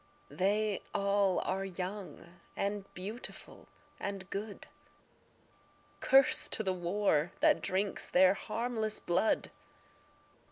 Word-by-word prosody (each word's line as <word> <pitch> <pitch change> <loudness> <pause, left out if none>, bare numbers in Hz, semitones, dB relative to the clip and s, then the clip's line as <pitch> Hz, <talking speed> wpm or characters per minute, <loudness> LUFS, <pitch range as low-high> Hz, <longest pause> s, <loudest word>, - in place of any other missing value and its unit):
They 205 +2 +1
all 200 -1 +2
are 190 +1 -1
young 185 -2 -7 0.2
and 200 0 -3
beautiful 210 +7 -8 0.3
and 195 -1 -5
good; 205 +1 -5 1.3
Curse 270 0 +5
to 220 - -1
the 190 -2 0
war 175 -2 +1
that 305 -1 +4
drinks 195 +2 -1
their 185 +1 +6
harmless 220 +1 -2
blood. 175 +5 +1
200 Hz, 95 wpm, -32 LUFS, 185-210 Hz, 1.3 s, their